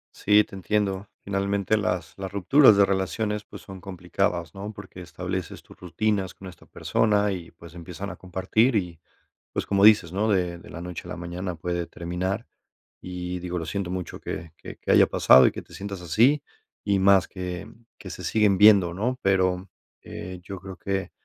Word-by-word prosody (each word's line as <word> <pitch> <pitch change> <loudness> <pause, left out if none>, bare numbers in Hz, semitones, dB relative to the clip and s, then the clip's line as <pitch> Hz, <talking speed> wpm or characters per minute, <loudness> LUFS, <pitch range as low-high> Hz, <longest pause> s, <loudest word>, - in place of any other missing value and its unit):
Sí, 105 +1 +4
te - - -12
entiendo. 100 +1 -1 0.2
Finalmente, 100 +1 0
las 90 -5 -2
las 95 -1 -5
rupturas 110 - +6
de 100 - +6
relaciones, 100 +3 -2
pues, - - -11
son 95 -1 -10
complicadas, 90 -2 -2
¿no? 100 +2 -7
Porque 100 -2 -11
estableces 90 +1 -5
tus - - -17
rutinas 95 +1 -1
con 95 - -12
esta 85 - -16
persona 105 -2 +1
y, 90 -3 -6
pues, 85 -1 -14
empiezan 90 +3 -7
a - - -8
compartir 100 +7 +1
y, 90 -5 -2 0.5
pues, - - -2
como 100 0 +3
dices, 105 -6 +6
¿no?, 105 +4 0
de 90 -4 0
de - - -14
la 85 - -8
noche 90 0 -6
a - - -10
la - - -5
mañana 90 +1 -5
puede 85 +1 -3
terminar, 90 +3 -3 0.6
y 90 0 -5
digo, 90 0 -4
lo 80 - -5
siento 95 +2 -3
mucho 90 -2 -5
que 80 -2 -6
que - - -10
que - - -1
haya - - +7
pasado 65 - +6
y - - -5
que - - -7
te - - -17
sientas 100 -1 -6
así, 120 - +3 0.4
y 100 -1 +2
más 95 -1 +5
que 90 -1 -6 0.3
que - - -10
se - - -7
siguen 105 -3 +2
viendo, 100 -5 +6
¿no? 125 +7 -1
Pero, 95 -1 +1 0.3
eh, 90 -1 -8
yo 95 0 -8
creo 95 0 -9
que, 95 +1 -3
95 Hz, 190 wpm, -25 LUFS, 90-100 Hz, 0.6 s, haya